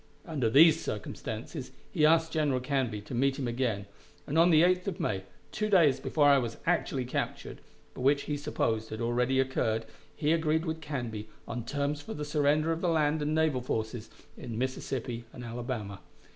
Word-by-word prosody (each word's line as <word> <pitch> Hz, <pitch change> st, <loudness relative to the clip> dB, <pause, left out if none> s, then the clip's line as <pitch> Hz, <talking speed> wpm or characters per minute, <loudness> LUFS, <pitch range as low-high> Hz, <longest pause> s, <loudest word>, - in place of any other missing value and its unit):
Under 140 Hz, -9 st, 0 dB
these 155 Hz, +6 st, +7 dB
circumstances -, -, -5 dB, 0.2 s
he 150 Hz, -, +4 dB
asked 165 Hz, 0 st, +3 dB
General 150 Hz, -5 st, +1 dB
Canby 125 Hz, -5 st, -1 dB
to 105 Hz, -, -9 dB
meet 135 Hz, +2 st, +1 dB
him 135 Hz, -3 st, -2 dB
again, 120 Hz, -5 st, -1 dB, 0.4 s
and 145 Hz, -, -4 dB
on 165 Hz, +2 st, +6 dB
the 160 Hz, -1 st, +6 dB
8th 180 Hz, +1 st, +2 dB
of 195 Hz, -, -3 dB
May, 95 Hz, -2 st, -1 dB, 0.3 s
two 215 Hz, 0 st, -1 dB
days 155 Hz, -9 st, +5 dB
before 145 Hz, +2 st, +1 dB
I 140 Hz, -1 st, +6 dB
was 115 Hz, -3 st, -4 dB
actually 150 Hz, -6 st, 0 dB
captured, 125 Hz, -, -4 dB, 0.3 s
but -, -, -8 dB
which 140 Hz, +2 st, +3 dB
he 150 Hz, -, -2 dB
supposed 110 Hz, -6 st, -1 dB
had 110 Hz, -, -6 dB
already 125 Hz, +3 st, +1 dB
occurred, 115 Hz, -4 st, 0 dB, 0.3 s
he 150 Hz, -1 st, +1 dB
agreed 160 Hz, 0 st, +1 dB
with 160 Hz, -1 st, -3 dB
Canby 120 Hz, -8 st, -5 dB, 0.2 s
on 120 Hz, -1 st, -4 dB
terms 145 Hz, +3 st, -2 dB
for -, -, -7 dB
the 150 Hz, 0 st, -4 dB
surrender 150 Hz, +1 st, +2 dB
of 165 Hz, +1 st, -2 dB
the 180 Hz, -, +1 dB
land 155 Hz, -1 st, +2 dB
and 150 Hz, +1 st, 0 dB
naval 155 Hz, -5 st, +2 dB
forces 110 Hz, -1 st, -3 dB, 0.3 s
in 115 Hz, -2 st, -7 dB
Mississippi 125 Hz, -2 st, -3 dB
and 125 Hz, -, -8 dB
Alabama. 115 Hz, -4 st, -5 dB
140 Hz, 185 wpm, -30 LUFS, 120-155 Hz, 0.4 s, these